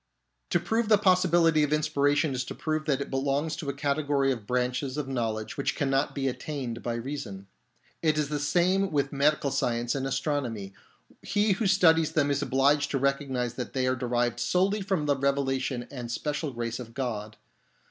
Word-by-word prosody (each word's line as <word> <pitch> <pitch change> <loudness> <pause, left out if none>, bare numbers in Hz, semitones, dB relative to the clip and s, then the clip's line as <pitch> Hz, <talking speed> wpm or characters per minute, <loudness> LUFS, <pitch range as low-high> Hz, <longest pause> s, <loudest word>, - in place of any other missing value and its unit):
To - - +2
prove 225 0 0
the 215 - +7
possibility 175 -5 +4
of 150 -1 +1
inspiration 145 -1 +2
is 125 -1 -1
to - - -7
prove 155 -1 -2
that 140 -3 +1
it - - -5
belongs 140 +3 0
to 145 - -4
a - - -1
category 140 -1 +1
of 115 -5 -5
branches 125 +2 -1
of 150 -3 -2
know 120 -4 -1
ledge 110 +10 -6
which 140 - -1
cannot 135 0 0
be 135 -1 -1
attained 125 -2 -4
by 120 -1 -2
reason. 115 -6 -5 0.6
It 155 -2 +2
is 150 -2 0
the 150 -1 -1
same 180 +6 +2
with 140 -2 0
medical 145 0 +2
science 120 -3 0
and 135 -1 -2
astronomy. 125 -9 -2 0.5
He 205 +1 +1
who 195 +2 +1
studies 165 -4 +4
them 145 -2 +2
is 140 0 0
obliged 140 +2 +2
to 140 - 0
recognise 135 -3 -1
that 125 -1 -6
they 130 -1 0
are 130 0 +2
derived 120 -1 -1
solely 195 +3 +1
from 190 -6 -1
the 145 -1 +2
revelation 135 -2 -1
and 120 -3 -6
special 150 +4 -2
grace 115 -1 -4
of 115 -2 -9
God. 110 -5 -4
140 Hz, 190 wpm, -28 LUFS, 125-155 Hz, 0.6 s, the